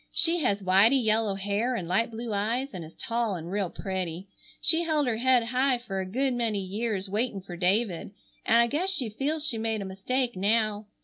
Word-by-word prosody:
She 335 Hz, +1 st, +3 dB
has 205 Hz, -9 st, 0 dB
whitey 200 Hz, +8 st, +5 dB
yellow 215 Hz, -2 st, +2 dB
hair 205 Hz, +6 st, -1 dB
and 180 Hz, -7 st, -4 dB
light 220 Hz, +7 st, +1 dB
blue 230 Hz, -1 st, -5 dB
eyes 230 Hz, +7 st, -1 dB
and 180 Hz, -, -6 dB
is 160 Hz, -, -12 dB
tall 230 Hz, -3 st, -1 dB
and 170 Hz, 0 st, -7 dB
real 200 Hz, -2 st, -1 dB
pretty. 185 Hz, -2 st, -4 dB, 0.3 s
She 325 Hz, +1 st, +3 dB
held 310 Hz, -3 st, +1 dB
her 235 Hz, -3 st, 0 dB
head 250 Hz, 0 st, +3 dB
high 255 Hz, +2 st, +1 dB
fer 200 Hz, -5 st, -5 dB
a 190 Hz, -, -5 dB
good 260 Hz, +6 st, 0 dB
many 230 Hz, -3 st, 0 dB
years 200 Hz, +1 st, -3 dB
waitin' 210 Hz, +1 st, -1 dB
fer 180 Hz, -1 st, -9 dB
David, 185 Hz, +1 st, 0 dB, 0.3 s
and 230 Hz, -, +4 dB
I 235 Hz, -, +6 dB
guess 305 Hz, +10 st, -1 dB
she 270 Hz, -, 0 dB
feels 290 Hz, +8 st, -2 dB
she 235 Hz, -7 st, 0 dB
made 220 Hz, -1 st, -1 dB
a -, -, -6 dB
mistake 235 Hz, +6 st, -2 dB
now. 210 Hz, +1 st, +1 dB
220 Hz, 205 wpm, -27 LUFS, 195-250 Hz, 0.3 s, I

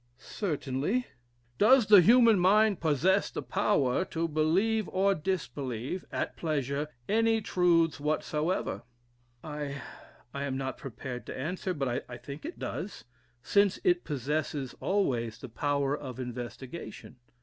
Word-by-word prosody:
"Certainly." 160 Hz, -, -2 dB, 0.5 s
"Does 245 Hz, +3 st, +6 dB
the 205 Hz, -2 st, +8 dB
human 230 Hz, +1 st, +6 dB
mind 205 Hz, +2 st, +4 dB
possess 165 Hz, +5 st, +2 dB
the -, -, -5 dB
power 185 Hz, -9 st, +1 dB
to 165 Hz, -1 st, -2 dB
believe 180 Hz, +8 st, +1 dB
or 195 Hz, +1 st, +2 dB
disbelieve, 150 Hz, -, -3 dB
at -, -, -2 dB
pleasure, 145 Hz, -2 st, -1 dB, 0.2 s
any 225 Hz, +1 st, +3 dB
truths 170 Hz, -6 st, +2 dB
whatsoever." 155 Hz, +4 st, -1 dB, 0.6 s
"I 145 Hz, -2 st, -5 dB, 0.5 s
am 140 Hz, -1 st, -2 dB
not 135 Hz, 0 st, -4 dB
prepared 125 Hz, -1 st, -7 dB
to -, -, -6 dB
answer: 180 Hz, +6 st, -3 dB
but 130 Hz, -4 st, -1 dB
I 120 Hz, -, -7 dB
think 140 Hz, -, -9 dB
it 340 Hz, -, -6 dB
does, 200 Hz, -, -5 dB, 0.4 s
since 200 Hz, +3 st, +3 dB
it 355 Hz, -1 st, +3 dB
possesses 145 Hz, -1 st, -2 dB
always 125 Hz, -, 0 dB
the 130 Hz, -, -9 dB
power 140 Hz, +4 st, 0 dB
of 130 Hz, -4 st, -8 dB
investigation." 125 Hz, +2 st, -7 dB
155 Hz, 125 wpm, -29 LUFS, 135-195 Hz, 0.6 s, the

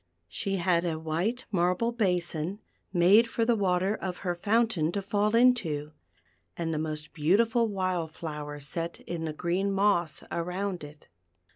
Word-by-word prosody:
She 195 Hz, -, -2 dB
had 175 Hz, -2 st, +2 dB
a 165 Hz, -3 st, -1 dB
white 170 Hz, +10 st, -2 dB
marble 180 Hz, +5 st, +1 dB
basin, 180 Hz, -5 st, -1 dB, 0.3 s
made 195 Hz, +6 st, +6 dB
for 230 Hz, 0 st, 0 dB
the 235 Hz, 0 st, +3 dB
water 190 Hz, -1 st, +1 dB
of 185 Hz, -4 st, -4 dB
her 175 Hz, -, +1 dB
fountain 205 Hz, -3 st, +1 dB
to 200 Hz, -, 0 dB
fall 210 Hz, +2 st, +1 dB
into, 190 Hz, -12 st, +3 dB, 0.7 s
and 165 Hz, -1 st, -2 dB
the 155 Hz, -, -1 dB
most 155 Hz, -1 st, -4 dB
beautiful 225 Hz, +9 st, +3 dB
wild 185 Hz, -5 st, -1 dB
flowers 150 Hz, -3 st, -6 dB
set 165 Hz, +3 st, -4 dB
in 170 Hz, -1 st, -4 dB
the 155 Hz, -, -2 dB
green 180 Hz, +5 st, 0 dB
moss 195 Hz, -6 st, +1 dB
around 180 Hz, +1 st, -2 dB
it. 150 Hz, +1 st, -12 dB
180 Hz, 150 wpm, -28 LUFS, 160-205 Hz, 0.7 s, made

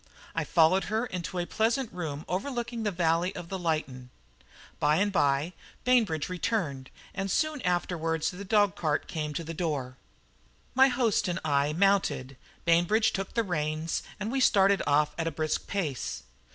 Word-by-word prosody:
I -, -, 0 dB
followed 175 Hz, +3 st, +4 dB
her 220 Hz, +3 st, -1 dB
into 180 Hz, -4 st, -5 dB
a 175 Hz, -, 0 dB
pleasant 230 Hz, +5 st, 0 dB
room 155 Hz, -4 st, -5 dB
overlooking 235 Hz, +4 st, -3 dB
the 215 Hz, -, 0 dB
valley 175 Hz, 0 st, +1 dB
of 170 Hz, -, -7 dB
the 190 Hz, -, -3 dB
Lytton. 155 Hz, -7 st, -2 dB, 0.7 s
By 150 Hz, +1 st, +3 dB
and 200 Hz, +4 st, +2 dB
by 145 Hz, 0 st, +1 dB, 0.3 s
Bainbridge 225 Hz, -, +2 dB
returned, 175 Hz, -, -2 dB, 0.2 s
and 195 Hz, 0 st, -3 dB
soon 305 Hz, -, 0 dB
afterwards 170 Hz, -3 st, 0 dB
the 185 Hz, +2 st, -8 dB
dog 205 Hz, -1 st, +3 dB
cart 155 Hz, -6 st, -1 dB
came 155 Hz, -2 st, -3 dB
to 165 Hz, -, -2 dB
the 165 Hz, +1 st, -6 dB
door. 145 Hz, -7 st, -3 dB, 0.8 s
My 265 Hz, +1 st, +6 dB
host 245 Hz, -7 st, +1 dB
and 180 Hz, 0 st, -1 dB
I 145 Hz, 0 st, +2 dB
mounted, 185 Hz, -8 st, +1 dB, 0.3 s
Bainbridge 175 Hz, +7 st, +3 dB
took 195 Hz, -1 st, -4 dB
the 230 Hz, -, +2 dB
reins, 155 Hz, -3 st, -2 dB, 0.2 s
and 210 Hz, +3 st, -3 dB
we 270 Hz, -, 0 dB
started 200 Hz, -5 st, +4 dB
off 150 Hz, +1 st, +3 dB
at 165 Hz, -, 0 dB
a -, -, 0 dB
brisk 155 Hz, +1 st, -2 dB
pace. 165 Hz, -10 st, -3 dB
175 Hz, 165 wpm, -28 LUFS, 155-205 Hz, 0.8 s, My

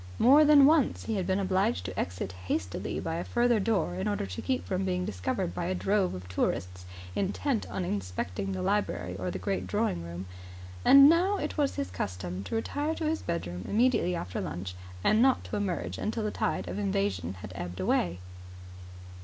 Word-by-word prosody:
More 280 Hz, +6 st, +7 dB
than 295 Hz, -2 st, +7 dB
once 300 Hz, -2 st, +3 dB
he 225 Hz, -, -2 dB
had 190 Hz, -4 st, -1 dB
been 190 Hz, 0 st, +2 dB
obliged 185 Hz, -, +1 dB
to 95 Hz, +1 st, -4 dB
exit 90 Hz, +1 st, -3 dB, 0.2 s
hastily 95 Hz, -2 st, -2 dB
by 165 Hz, 0 st, -3 dB
a 170 Hz, -, -2 dB
further 240 Hz, -2 st, +2 dB
door 200 Hz, -, +1 dB
in 95 Hz, +1 st, -2 dB
order 100 Hz, -1 st, -1 dB
to 90 Hz, -1 st, -6 dB
keep 260 Hz, -1 st, -1 dB
from 190 Hz, 0 st, -1 dB
being 180 Hz, -1 st, -1 dB
discovered 90 Hz, -2 st, -2 dB
by 135 Hz, -, -3 dB
a 185 Hz, +2 st, -1 dB
drove 195 Hz, -, +1 dB
of 90 Hz, 0 st, -8 dB
tourists 90 Hz, 0 st, -2 dB, 0.3 s
intent 95 Hz, 0 st, -1 dB
on 100 Hz, -3 st, -3 dB
inspecting 90 Hz, 0 st, -3 dB
the 95 Hz, -1 st, -3 dB
library 90 Hz, 0 st, -1 dB
or 95 Hz, -1 st, -3 dB
the 90 Hz, -, -3 dB
great 95 Hz, 0 st, -2 dB
drawing 90 Hz, -1 st, 0 dB
room; 85 Hz, +2 st, -6 dB, 0.6 s
and 275 Hz, 0 st, +9 dB
now 360 Hz, +6 st, +4 dB
it 300 Hz, -, -3 dB
was 290 Hz, -3 st, +1 dB
his 90 Hz, 0 st, -3 dB
custom 90 Hz, 0 st, -4 dB
to -, -, -4 dB
retire 290 Hz, +7 st, -1 dB
to 320 Hz, -, -3 dB
his 315 Hz, +1 st, 0 dB
bedroom 90 Hz, -, -4 dB
immediately 225 Hz, -5 st, +2 dB
after 90 Hz, -, -4 dB
lunch 90 Hz, +1 st, -5 dB, 0.3 s
and 215 Hz, +2 st, +4 dB
not 265 Hz, 0 st, +4 dB
to -, -, -5 dB
emerge 200 Hz, -4 st, -2 dB
until 220 Hz, +1 st, -2 dB
the 210 Hz, -, -1 dB
tide 95 Hz, -, -1 dB
of 90 Hz, +3 st, -4 dB
invasion 95 Hz, -2 st, -1 dB
had 95 Hz, +1 st, -9 dB
ebbed 90 Hz, +1 st, -6 dB
away. 90 Hz, -1 st, +1 dB
100 Hz, 195 wpm, -29 LUFS, -, 0.6 s, and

